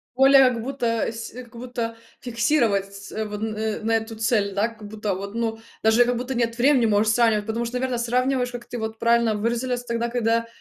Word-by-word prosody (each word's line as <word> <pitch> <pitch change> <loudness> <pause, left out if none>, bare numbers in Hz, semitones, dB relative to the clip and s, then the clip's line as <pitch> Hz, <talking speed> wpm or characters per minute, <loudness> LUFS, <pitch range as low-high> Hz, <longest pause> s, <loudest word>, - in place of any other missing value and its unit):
Более, 270 0 +7
как 230 -2 -3
будто 270 0 -3 0.3
с 225 0 -7
как 240 -1 -11
будто, 235 -1 -4 0.2
фиксировать 230 -5 +1
ц 200 +2 -5
вон 215 +1 -4
н 215 0 -3
на 225 - +2
эту 225 0 -2
цель, 215 -3 +1
да, 205 +3 +1
как 220 -3 -11
будто, 210 -2 -3
вот, 200 +3 -7
ну, 225 -1 -2 0.2
даже 220 +2 +5
я, - - +6
как 245 0 0
будто, 250 +1 -4
нет 230 -1 0
времени 255 -1 +4
можешь 215 +1 +3
сравнивать, 225 -3 +3
потому 225 +2 -2
что 235 +2 -5
наверно, 255 -1 -1
сравниваешь, 250 +1 0
как 245 -1 -7
ты 245 - -6
вот 220 -1 -5
правильно 235 -2 +3
выразилась, 240 +3 -1
тогда, 235 0 -1
когда 230 -1 0
230 Hz, 210 wpm, -24 LUFS, 220-245 Hz, 0.3 s, Более